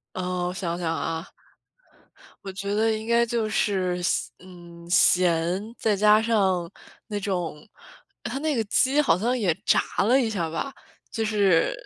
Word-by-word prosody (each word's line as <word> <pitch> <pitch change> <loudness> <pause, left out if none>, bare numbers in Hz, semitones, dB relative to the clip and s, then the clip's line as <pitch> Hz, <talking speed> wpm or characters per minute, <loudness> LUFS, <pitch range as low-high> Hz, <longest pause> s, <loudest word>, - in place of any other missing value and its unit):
呃， 180 -1 -2
我 180 - -3
想 175 -3 -3
想 165 -2 -2
啊。 165 +1 -4 1.1
我 195 - -5
觉 200 +1 -4
得 220 +1 +2
应 220 0 -3
该 235 0 +3
就 230 -2 -1
是 190 -5 0
咸 175 - -1
嗯， 175 -2 -14
咸， 175 0 +3 0.2
再 215 -2 +1
加 210 +1 +5
上 195 -6 +1 0.4
那 210 -2 -4
种 180 -6 -2 0.7
它 240 +3 -4
那 310 -2 -1
个 225 - 0
鸡 265 +7 +2
好 285 - +4
像 240 +7 0
也 190 -8 +1
炸 - - +4 0.3
了 255 +4 +4
一 240 - +1
下 175 -7 -2
吧。 270 +12 -4 0.4
就 225 - -2
是 200 - +2
195 Hz, 170 characters per minute, -25 LUFS, 175-225 Hz, 1.1 s, 加